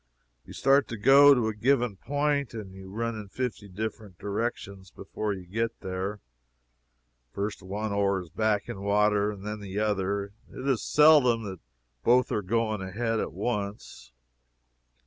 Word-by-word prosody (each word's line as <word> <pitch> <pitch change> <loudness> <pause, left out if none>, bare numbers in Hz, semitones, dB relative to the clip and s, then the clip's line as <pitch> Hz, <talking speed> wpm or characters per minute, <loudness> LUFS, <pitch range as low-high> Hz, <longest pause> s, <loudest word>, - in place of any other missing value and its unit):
You - - -10
start 140 +1 +3
to 115 - -6
go 140 +5 +7
to 120 -3 +1
a 110 - -1
given 120 0 +1
point 145 +2 -1
and 100 -4 -7
you 95 0 -11
run 115 +3 -2
in 105 -2 -7
fifty 115 -2 -4
different 105 -1 -6
directions 100 -2 -4
before 105 -1 -5
you 95 -2 -6
get 115 +5 -3
there. 95 +2 -4 1.1
First 100 +1 -3
one 105 +3 -4
oar 100 -1 +1
is 85 - -12
backing 100 +1 -1
water, 105 0 +2
and 100 -2 -7
then 105 0 -4
the 100 -1 -7
other; 100 -1 -1 0.2
it 130 - -6
is 130 -5 +1
seldom 145 -7 +5
that 95 -4 -6 0.4
both 125 +1 +4
are 105 - 0
going 110 +1 -1
ahead 110 +4 -2
at - - -2
once. 100 - -4
105 Hz, 155 wpm, -27 LUFS, 100-115 Hz, 1.1 s, go